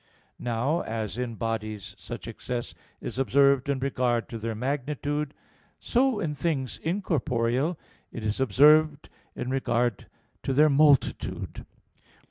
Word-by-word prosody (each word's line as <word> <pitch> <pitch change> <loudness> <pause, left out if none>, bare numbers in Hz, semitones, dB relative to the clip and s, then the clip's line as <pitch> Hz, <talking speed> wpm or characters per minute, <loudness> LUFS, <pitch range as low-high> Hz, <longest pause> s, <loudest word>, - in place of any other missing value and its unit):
Now, 125 +7 0
as 110 +1 -4
in 120 -2 -3
bodies 110 -3 -4
such - - -7
excess 120 -1 -5 0.3
is - - -5
observed 140 +2 +3
in 140 - +1
regard 125 -3 0
to 115 - -6
their 115 0 -3
magnitude, 145 +3 -2 0.4
so 255 -2 +2
in 160 -7 -1
things 140 -5 -2
incorporeal 150 - 0 0.3
is 110 -1 -3
it - - +4
observed 150 +5 +5 0.3
in 125 +1 -3
regard 120 -4 0 0.3
to 135 - -1
their 150 +3 +5
multitude. 145 -1 +2
130 Hz, 120 wpm, -27 LUFS, 115-150 Hz, 0.4 s, observed